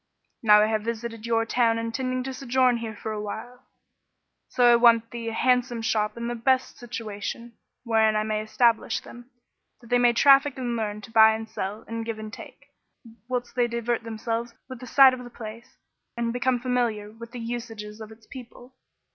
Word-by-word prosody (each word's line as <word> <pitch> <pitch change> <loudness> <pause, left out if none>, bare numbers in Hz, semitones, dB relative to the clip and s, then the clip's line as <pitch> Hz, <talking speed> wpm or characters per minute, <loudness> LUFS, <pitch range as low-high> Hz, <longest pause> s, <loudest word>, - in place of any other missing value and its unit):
Now 210 -2 +6
I - - +4
have 215 0 0
visited 230 0 -5
your 225 -1 +1
town 230 -1 +2
intending 255 +3 -2
to 265 +1 -5
sojourn 255 -1 +2
here 225 -2 -6
for 220 - -6
a 210 -1 -4
while; 245 +4 -8 0.8
so 245 -1 +5
I - - +7
want 235 -1 +5
of 230 - -35
thee 235 -1 -5
a - - -6
handsome 250 -1 +1
shop 210 -1 0
in 235 0 -4
the 240 - -2
best 255 +2 0
situation, 230 0 -6 0.3
wherein 220 -2 +2
I 215 - +1
may 215 0 -1
establish 230 +1 +1
them, 240 +1 -13 0.5
that 235 -2 -17
they 245 - +4
may 240 -1 +4
traffic 275 +2 +5
and 245 -2 -2
learn 210 -2 -3
to 225 - -12
buy 220 -1 +6
and 220 0 -6
sell 210 0 -5
and 230 0 -4
give 225 -1 -4
and 215 0 -8
take, - - -12 0.6
whilst 250 -1 -3
they 245 -1 +1
divert 235 0 -2
themselves 230 +1 -4
with 255 -2 -9
the 255 - -10
sight 265 +2 +7
of 250 -1 -6
the 245 - -10
place, 230 0 -10 0.4
and 235 0 -1
be 245 - -3
come 255 -1 +1
familiar 235 -4 -1
with 230 +1 -11
the 245 - -7
usages 225 -2 -6
of 220 0 -9
its 220 0 -16
people." 250 0 -12
235 Hz, 200 wpm, -25 LUFS, 220-245 Hz, 0.8 s, I